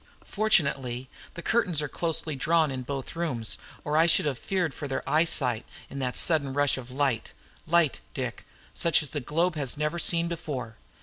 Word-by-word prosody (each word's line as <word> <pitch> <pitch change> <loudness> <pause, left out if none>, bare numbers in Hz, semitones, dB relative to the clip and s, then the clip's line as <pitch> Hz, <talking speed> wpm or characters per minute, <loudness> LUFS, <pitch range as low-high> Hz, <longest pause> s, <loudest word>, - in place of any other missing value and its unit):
Fortunately, 135 - +1 0.2
the 170 - -7
curtains 200 -9 +1
are 150 - -1
closely 160 0 -2
drawn 155 +2 +2
in 130 -1 -4
both 135 +3 -5
rooms, 125 - -2 0.2
or 150 +1 0
I 165 +1 +5
should 170 +1 +4
have 135 -5 -1
feared 180 -6 -1
for 145 - -6
their 135 - -3
eyesight 150 -7 +3 0.3
in 140 - -5
that 125 -2 -1
sudden 140 -5 +2
rush 145 -1 +2
of 130 -2 -8
light 130 -3 -1 0.3
light, 165 -3 +3 0.2
Dick, - - -4 0.3
such 170 -2 +2
as 150 - -6
this 145 -4 -3
globe 165 +7 +1
has 140 -2 -1
never 150 +3 -1
seen 170 0 +4
before! 145 -9 -5
150 Hz, 180 wpm, -27 LUFS, 130-170 Hz, 0.3 s, I